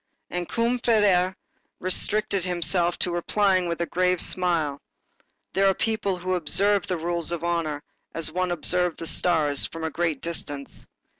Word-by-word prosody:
And 175 Hz, -1 st, -3 dB
Combeferre 215 Hz, -6 st, +2 dB, 0.4 s
restricted 195 Hz, +1 st, 0 dB
himself 175 Hz, -1 st, +1 dB
to 180 Hz, -, +1 dB
replying 185 Hz, +1 st, +1 dB
with 170 Hz, 0 st, -3 dB
a -, -, +1 dB
grave 180 Hz, +1 st, +1 dB
smile. 165 Hz, -6 st, 0 dB, 0.7 s
"There 195 Hz, +1 st, +3 dB
are 195 Hz, -, +3 dB
people 215 Hz, -4 st, -1 dB
who 185 Hz, +1 st, -2 dB
observe 200 Hz, +3 st, +2 dB
the 180 Hz, -, -1 dB
rules 170 Hz, 0 st, 0 dB
of 170 Hz, -1 st, -3 dB
honor 165 Hz, -4 st, -1 dB, 0.3 s
as 165 Hz, -1 st, -1 dB
one 185 Hz, +2 st, -1 dB
observes 175 Hz, 0 st, +1 dB
the -, -, -6 dB
stars, 155 Hz, -4 st, +2 dB
from 165 Hz, 0 st, -8 dB
a 160 Hz, -, -2 dB
great 165 Hz, -3 st, -1 dB
distance." 145 Hz, -4 st, -1 dB
175 Hz, 150 wpm, -25 LUFS, 165-185 Hz, 0.7 s, There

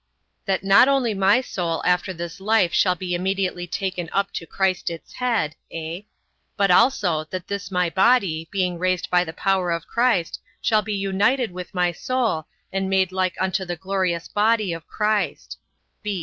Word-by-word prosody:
A. -, -, -51 dB, 0.4 s
That 190 Hz, -1 st, 0 dB
not 195 Hz, +6 st, +6 dB
only 270 Hz, -5 st, +2 dB
my 195 Hz, +5 st, +3 dB
soul 170 Hz, -9 st, -3 dB
after 180 Hz, +1 st, +2 dB
this 170 Hz, -1 st, -7 dB
life 195 Hz, -3 st, +2 dB
shall 180 Hz, -2 st, +3 dB
be 180 Hz, 0 st, -4 dB
immediately 185 Hz, 0 st, -1 dB
taken 180 Hz, -2 st, -3 dB
up 200 Hz, 0 st, 0 dB
to 165 Hz, -, -5 dB
Christ 190 Hz, -2 st, 0 dB
its 165 Hz, -1 st, -9 dB
head; 225 Hz, -12 st, 0 dB, 0.2 s
(a) 165 Hz, +5 st, -6 dB, 0.5 s
but 200 Hz, -2 st, +3 dB
also, 180 Hz, -, +3 dB
that 180 Hz, +2 st, -6 dB
this 200 Hz, -1 st, -4 dB
my 180 Hz, -2 st, +1 dB
body, 190 Hz, -4 st, +2 dB
being 180 Hz, -3 st, -1 dB
raised 185 Hz, -1 st, 0 dB
by 180 Hz, 0 st, +4 dB
the 160 Hz, -, -6 dB
power 190 Hz, +1 st, 0 dB
of 170 Hz, -2 st, -2 dB
Christ, 235 Hz, -8 st, 0 dB, 0.2 s
shall 215 Hz, -2 st, +2 dB
be 210 Hz, +1 st, -4 dB
reunited 205 Hz, +5 st, +1 dB
with 180 Hz, +1 st, -8 dB
my 180 Hz, -1 st, +2 dB
soul, 225 Hz, -, -1 dB, 0.3 s
and 195 Hz, 0 st, -1 dB
made 190 Hz, -1 st, +2 dB
like 185 Hz, -1 st, 0 dB
unto 190 Hz, +1 st, 0 dB
the 175 Hz, -1 st, -4 dB
glorious 185 Hz, -2 st, -2 dB
body 210 Hz, -3 st, +1 dB
of 165 Hz, 0 st, -8 dB
Christ. 215 Hz, -1 st, -1 dB
190 Hz, 175 wpm, -23 LUFS, 175-200 Hz, 0.5 s, not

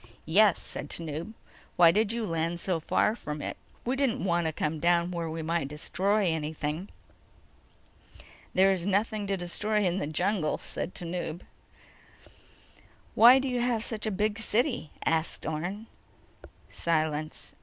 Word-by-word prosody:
"Yes," 195 Hz, +4 st, +5 dB
said -, -, -6 dB
Tanub. 165 Hz, +4 st, -5 dB, 0.4 s
"Why 170 Hz, -2 st, +7 dB
did 215 Hz, +3 st, +2 dB
you 230 Hz, -1 st, -2 dB
land 165 Hz, -1 st, -1 dB
so 180 Hz, -2 st, -1 dB
far 210 Hz, +6 st, +1 dB
from 150 Hz, -9 st, -6 dB
it?" -, -, -4 dB, 0.3 s
"We 250 Hz, +2 st, 0 dB
didn't 265 Hz, -2 st, 0 dB
want 175 Hz, -3 st, +1 dB
to -, -, 0 dB
come 155 Hz, 0 st, -2 dB
down 175 Hz, +1 st, +2 dB
where 170 Hz, -2 st, -3 dB
we 160 Hz, 0 st, -4 dB
might 165 Hz, -3 st, -1 dB
destroy 195 Hz, +8 st, 0 dB
anything." 160 Hz, +1 st, -2 dB, 1.7 s
"There 190 Hz, +1 st, +5 dB
is 185 Hz, -3 st, -1 dB
nothing 205 Hz, +2 st, 0 dB
to 195 Hz, -1 st, 0 dB
destroy 210 Hz, +4 st, 0 dB
in 180 Hz, 0 st, +1 dB
the 145 Hz, -, -2 dB
jungle," 175 Hz, +1 st, 0 dB
said 180 Hz, -, -5 dB
Tanub. 175 Hz, -1 st, -4 dB, 1.7 s
"Why 240 Hz, +3 st, +8 dB
do 270 Hz, +1 st, 0 dB
you 250 Hz, -2 st, 0 dB
have 240 Hz, -2 st, 0 dB
such 220 Hz, -2 st, -4 dB
a -, -, +2 dB
big 210 Hz, +2 st, -1 dB
city?" 235 Hz, -, 0 dB, 0.2 s
asked 160 Hz, 0 st, 0 dB
Orne. 175 Hz, +8 st, -3 dB, 0.8 s
Silence. 155 Hz, -2 st, -2 dB
175 Hz, 145 wpm, -28 LUFS, 160-215 Hz, 1.7 s, Why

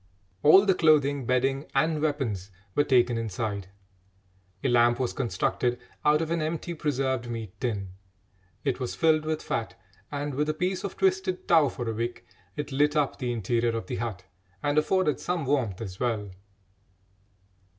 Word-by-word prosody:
All 190 Hz, +7 st, +7 dB
the 195 Hz, -, +5 dB
clothing, 145 Hz, -6 st, +3 dB
bedding, 135 Hz, +3 st, +1 dB
and 155 Hz, +2 st, +2 dB
weapons 130 Hz, -, -1 dB, 0.2 s
were 145 Hz, -, +3 dB
taken 120 Hz, -4 st, +3 dB
inside. 105 Hz, -2 st, -3 dB, 1.0 s
A -, -, +2 dB
lamp 120 Hz, 0 st, +4 dB
was 125 Hz, -2 st, -1 dB
constructed 120 Hz, +1 st, 0 dB, 0.3 s
out 150 Hz, +2 st, +4 dB
of 160 Hz, -, -4 dB
an 170 Hz, -1 st, 0 dB
empty 165 Hz, +2 st, -3 dB
preserved 130 Hz, -6 st, -1 dB
meat 115 Hz, -5 st, -5 dB
tin; 105 Hz, -6 st, -2 dB, 0.7 s
it 135 Hz, -2 st, 0 dB
was 125 Hz, -2 st, -3 dB
filled 155 Hz, -2 st, +3 dB
with 155 Hz, 0 st, -2 dB
fat, -, -, -3 dB, 0.3 s
and, 145 Hz, 0 st, -3 dB
with 150 Hz, +3 st, 0 dB
a 155 Hz, -, 0 dB
piece 185 Hz, +3 st, -1 dB
of 200 Hz, -, -5 dB
twisted 190 Hz, -1 st, 0 dB
tow 160 Hz, -5 st, +5 dB
for 120 Hz, 0 st, -5 dB
a 115 Hz, -, -1 dB
wick, 120 Hz, +1 st, -4 dB, 0.3 s
it 150 Hz, -1 st, -4 dB
lit 145 Hz, +2 st, +2 dB
up 150 Hz, -3 st, +1 dB
the 125 Hz, -2 st, -1 dB
interior 115 Hz, +1 st, 0 dB
of 115 Hz, -, -5 dB
the -, -, -4 dB
hut 105 Hz, -4 st, -4 dB, 0.4 s
and 145 Hz, +1 st, +3 dB
afforded 185 Hz, -1 st, +1 dB
some 175 Hz, -4 st, -2 dB
warmth 125 Hz, -9 st, 0 dB
as 95 Hz, -4 st, -6 dB
well. 110 Hz, -5 st, -1 dB
135 Hz, 165 wpm, -27 LUFS, 120-155 Hz, 1.0 s, All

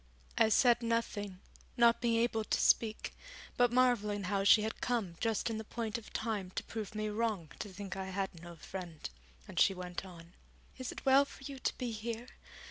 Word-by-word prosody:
I 220 Hz, -, +5 dB
said 240 Hz, +1 st, +5 dB
nothing, 210 Hz, -5 st, -2 dB, 0.4 s
not 235 Hz, -1 st, +5 dB
being 235 Hz, -2 st, +2 dB
able 230 Hz, -2 st, +1 dB
to -, -, 0 dB
speak, 220 Hz, -1 st, +2 dB, 0.4 s
but 245 Hz, -1 st, +4 dB
marvelling 235 Hz, -5 st, +2 dB
how 195 Hz, +1 st, 0 dB
she 210 Hz, +2 st, +7 dB
had 220 Hz, -, -4 dB
come 225 Hz, -9 st, -1 dB
just 225 Hz, 0 st, 0 dB
in 220 Hz, -, -2 dB
the -, -, -5 dB
point 225 Hz, 0 st, -3 dB
of 225 Hz, -, -14 dB
time 215 Hz, -5 st, -2 dB
to -, -, -2 dB
prove 220 Hz, -1 st, -6 dB
me 215 Hz, 0 st, -1 dB
wrong 210 Hz, -7 st, -1 dB
to 210 Hz, -, -4 dB
think 195 Hz, +1 st, -6 dB
I 190 Hz, 0 st, -4 dB
had 190 Hz, -3 st, -3 dB
no 170 Hz, 0 st, -9 dB
friend; 170 Hz, -1 st, -7 dB, 0.4 s
and -, -, -3 dB
she 195 Hz, -, +5 dB
went 180 Hz, 0 st, -5 dB
on: 175 Hz, -2 st, -12 dB, 0.5 s
'Is 255 Hz, -, -3 dB
it -, -, -9 dB
well 270 Hz, +1 st, +7 dB
for 280 Hz, -, -12 dB
you 275 Hz, 0 st, -7 dB
to -, -, -1 dB
be 250 Hz, -2 st, -2 dB
here? 230 Hz, +2 st, -5 dB
220 Hz, 200 wpm, -34 LUFS, 195-235 Hz, 0.5 s, she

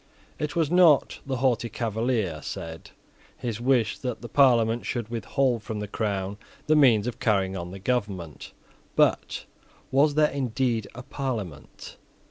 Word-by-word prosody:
It 150 Hz, -1 st, -3 dB
was 165 Hz, -2 st, +1 dB
not, 175 Hz, -5 st, +5 dB
the 135 Hz, -, -1 dB
haughty 120 Hz, -2 st, +1 dB
Cavalier 110 Hz, -8 st, -1 dB
said, 80 Hz, 0 st, -7 dB, 0.5 s
his 115 Hz, -2 st, -4 dB
wish 125 Hz, -3 st, +2 dB
that 125 Hz, -2 st, -4 dB
the -, -, -5 dB
Parliament 120 Hz, -4 st, +4 dB
should 120 Hz, -3 st, -3 dB
withhold 120 Hz, +2 st, 0 dB
from 110 Hz, -1 st, -5 dB
the 105 Hz, -, -4 dB
crown 100 Hz, -1 st, -3 dB, 0.3 s
the 155 Hz, -, +3 dB
means 120 Hz, -8 st, +5 dB
of 125 Hz, -, -4 dB
carrying 95 Hz, -3 st, +1 dB
on 85 Hz, -1 st, -5 dB
the 95 Hz, -, -8 dB
government. 95 Hz, -, -3 dB, 0.4 s
But -, -, +1 dB, 0.5 s
was 145 Hz, +2 st, +3 dB
there 150 Hz, 0 st, +4 dB
indeed 125 Hz, -4 st, -1 dB
a 125 Hz, -, -8 dB
Parliament? 115 Hz, -, -6 dB
115 Hz, 145 wpm, -26 LUFS, 105-130 Hz, 0.5 s, not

